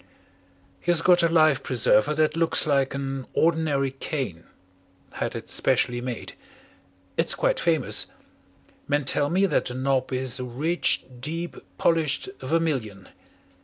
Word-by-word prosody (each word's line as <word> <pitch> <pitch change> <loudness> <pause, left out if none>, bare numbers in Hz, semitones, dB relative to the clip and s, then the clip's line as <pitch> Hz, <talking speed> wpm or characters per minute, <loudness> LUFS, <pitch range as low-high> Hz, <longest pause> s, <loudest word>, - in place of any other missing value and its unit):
"He - - -6
has 170 -1 +3
got 180 -1 +5
a 170 - +4
life 155 -4 +4
preserver 130 +3 +2
that 155 0 +2
looks 165 0 +2
like 140 -3 +1
an 135 -1 -4
ordinary 155 -5 +1
cane 130 - -5 0.7
had - - -4
it - - -6
specially 120 0 +1
made. 125 -2 -5 0.8
It's - - +2
quite - - +1
famous. - - 0 0.8
Men 145 0 0
tell 145 +1 +1
me 190 +3 +3
that 195 - +1
the 125 - -5
knob 130 0 0
is 130 -1 -1
a - - -3
rich, 145 +8 -1 0.2
deep, 165 +6 -4 0.2
polished 165 - +1
vermilion. 130 - -2
145 Hz, 135 wpm, -25 LUFS, 130-165 Hz, 0.8 s, got